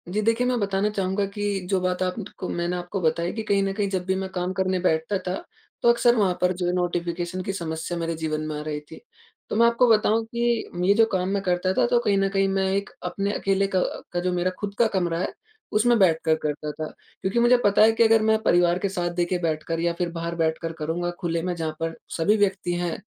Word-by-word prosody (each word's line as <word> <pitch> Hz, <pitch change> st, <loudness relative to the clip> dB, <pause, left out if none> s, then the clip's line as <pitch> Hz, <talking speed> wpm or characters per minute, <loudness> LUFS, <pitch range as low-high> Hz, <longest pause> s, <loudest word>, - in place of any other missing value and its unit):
जी, 205 Hz, +4 st, 0 dB
देखिए, 230 Hz, +3 st, +2 dB
मैं 250 Hz, -1 st, +1 dB
बताना 200 Hz, 0 st, 0 dB
चाहूँगा 195 Hz, -1 st, -1 dB
कि 205 Hz, -1 st, -1 dB
जो 195 Hz, -2 st, +2 dB
बात 180 Hz, 0 st, -1 dB
आप 180 Hz, 0 st, -1 dB
ट -, -, -18 dB
को 185 Hz, -, -4 dB
मैंने 175 Hz, +1 st, -1 dB
आपको 180 Hz, +2 st, -4 dB
बताई 170 Hz, +1 st, 0 dB
कि 220 Hz, -, -4 dB
कहीं 200 Hz, -2 st, +2 dB
न 195 Hz, 0 st, -1 dB
कहीं, 200 Hz, -1 st, -1 dB
जब 185 Hz, -2 st, -2 dB
भी 190 Hz, 0 st, 0 dB
मैं 190 Hz, 0 st, -3 dB
काम 180 Hz, +1 st, -1 dB
करने 190 Hz, -1 st, 0 dB
बैठता 165 Hz, +2 st, +1 dB
था, 180 Hz, -, 0 dB, 0.5 s
तो 235 Hz, -, +4 dB
अक़्सर 235 Hz, 0 st, +4 dB
वहाँ 195 Hz, -5 st, +2 dB
पर 180 Hz, 0 st, +3 dB
जो 180 Hz, 0 st, -3 dB
है, 175 Hz, -, +1 dB
नोटिफ़िकेशन 175 Hz, 0 st, -2 dB
की 195 Hz, -, -3 dB
समस्या 165 Hz, -1 st, -4 dB
मेरे 165 Hz, 0 st, -2 dB
जीवन 155 Hz, -1 st, -2 dB
में 155 Hz, -, -4 dB
आ -, -, -5 dB
रही 150 Hz, -1 st, -3 dB
थी। 150 Hz, -, -13 dB, 0.5 s
तो -, -, -2 dB
मैं 230 Hz, +2 st, +5 dB
आपको 235 Hz, +1 st, +3 dB
बताऊँ 220 Hz, +1 st, +3 dB
कि 235 Hz, 0 st, -1 dB, 0.2 s
ये 200 Hz, -, +6 dB
जो 225 Hz, +1 st, +6 dB
काम 185 Hz, -1 st, 0 dB
मैं 200 Hz, 0 st, 0 dB
करता 180 Hz, 0 st, +1 dB
था, -, -, +3 dB
तो 240 Hz, -, +3 dB
कहीं 210 Hz, -4 st, +1 dB
न 195 Hz, 0 st, +2 dB
कहीं 195 Hz, 0 st, +2 dB
मैं 195 Hz, 0 st, +1 dB
एक 200 Hz, +1 st, -1 dB
अपने 200 Hz, +1 st, -2 dB
अकेले 195 Hz, 0 st, +1 dB
का -, -, +4 dB, 0.3 s
का 175 Hz, -, -1 dB
जो 180 Hz, +1 st, 0 dB
मेरा 180 Hz, +1 st, 0 dB
खुद 205 Hz, -1 st, -4 dB
का 235 Hz, -, +5 dB
कमरा 170 Hz, -2 st, 0 dB
है, 185 Hz, -, -2 dB, 0.4 s
उसमें 235 Hz, +3 st, +3 dB
बैठकर 160 Hz, -4 st, +3 dB
करता 150 Hz, 0 st, -2 dB
था। 155 Hz, +1 st, -5 dB, 0.3 s
क्योंकि 190 Hz, +5 st, 0 dB
मुझे 240 Hz, +1 st, +5 dB
पता 200 Hz, 0 st, +4 dB
है 220 Hz, +1 st, +7 dB
कि 225 Hz, +1 st, +3 dB
अगर 225 Hz, 0 st, +5 dB
मैं 220 Hz, 0 st, +3 dB
परिवार 175 Hz, 0 st, +3 dB
के 200 Hz, -, -1 dB
साथ, 175 Hz, -2 st, -2 dB
देखिए, 175 Hz, +1 st, 0 dB
बैठकर 165 Hz, 0 st, -2 dB
या 170 Hz, 0 st, +1 dB
फिर 175 Hz, -1 st, -1 dB
बाहर 170 Hz, 0 st, -4 dB
बैठकर 165 Hz, 0 st, -1 dB
करूँगा, 165 Hz, +3 st, -2 dB
खुले 170 Hz, -2 st, -1 dB
में, 180 Hz, +1 st, -2 dB
जहाँ 160 Hz, -2 st, -3 dB
पर 165 Hz, 0 st, -2 dB, 0.2 s
सभी 205 Hz, +6 st, +3 dB
व्यक्ति 190 Hz, -3 st, 0 dB
हैं, 175 Hz, -1 st, -2 dB
185 Hz, 245 wpm, -24 LUFS, 170-205 Hz, 0.5 s, है